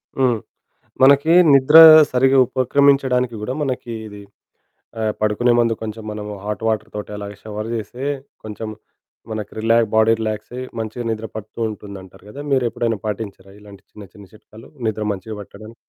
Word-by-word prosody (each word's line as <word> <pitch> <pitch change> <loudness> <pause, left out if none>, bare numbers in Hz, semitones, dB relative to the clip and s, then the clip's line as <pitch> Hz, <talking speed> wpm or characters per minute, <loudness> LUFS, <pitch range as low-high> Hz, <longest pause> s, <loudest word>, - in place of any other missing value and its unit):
హ్మ్. 125 -4 +1 0.6
మనకి 140 +4 +5 0.2
నిద్ర 140 +3 +6 0.3
సరిగ్గా 135 +1 +3
ఉపక్రమించడానికి 130 -1 +2
గూడా, 125 +5 -3
మనకి 125 -3 -4
ఇది 105 -1 -11 0.8
ఆహ్, 110 -1 -1
పడుకునే 105 +3 +1
ముందు 115 -1 +2
కొంచెం 110 0 -6
మనము 105 0 -6
హాట్ 105 +1 -5
వాటర్ 110 -1 -2
తోటి 105 0 -7
అలాగే 100 0 -8
షవర్ 110 +1 -6
జేస్తే, 115 +4 -6 0.4
కొంచెం 110 +1 -7 0.6
మనకి 105 -2 -5
రిలా 115 +1 +3 0.2
బాడీ 110 +1 +4
రిలాక్సయి 110 +3 -5 0.2
మంచిగా 110 +2 -5
నిద్ర 110 0 -3
పడుతూంటుందంటారు 105 -3 -7
గదా! 140 - -9
మీరెప్పుడైనా 120 -3 0
పాటించారా 100 -2 -6
ఇలాంటి 100 -1 -15
చిన్న, 105 - -13
చిన్న 100 -1 -14
చిట్కాలు, 110 +1 -16 0.2
నిద్ర 110 0 -3
మంచిగా 100 +2 -6
పట్టడానికి? 110 +3 -13
110 Hz, 140 wpm, -20 LUFS, 105-125 Hz, 0.8 s, నిద్ర